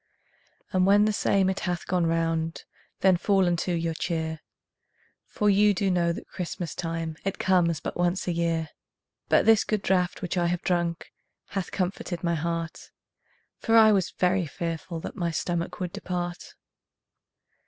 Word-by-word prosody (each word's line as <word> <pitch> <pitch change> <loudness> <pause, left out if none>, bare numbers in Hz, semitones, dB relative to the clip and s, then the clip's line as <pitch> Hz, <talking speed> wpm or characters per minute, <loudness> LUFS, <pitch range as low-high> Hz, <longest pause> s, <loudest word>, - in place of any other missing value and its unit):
And 185 0 +3
when 205 +1 +6
the 215 - +1
same 195 -1 +2
it 190 0 -1
hath 175 -2 -3
gone 180 -2 +1
round 165 0 -1 0.4
Then 190 -2 +5
fall 195 +1 +2
unto 175 +1 0
your 165 -1 -1
cheer, 160 -1 -3 0.9
For 210 - -1
you 205 0 +5
do 195 +1 +1
know 170 -1 +2
that 170 - -7
Christmas 175 -2 -5
time 165 -1 -4
It 195 - -2
comes 175 -4 +2
but - - -5
once 175 +2 0
a - - +1
year. 165 -2 -1 0.6
But - - +4
this 225 -1 +6
good 215 -2 -1
draught 180 -1 0
which 180 +1 -2
I 175 -1 +2
have 175 0 -1
drunk 170 -2 -1 0.4
Hath 195 -2 -3
comforted 180 -2 -3
my 170 -1 +1
heart, 165 +1 -3 0.7
For 230 0 +3
I 220 -1 +8
was 195 -3 +2
very 180 -1 +2
fearful 165 +2 -4
that - - -7
My 175 -4 -1
stomach 170 +1 -2
would 180 -2 -3
depart. 175 -1 -5
175 Hz, 165 wpm, -26 LUFS, 165-190 Hz, 0.9 s, I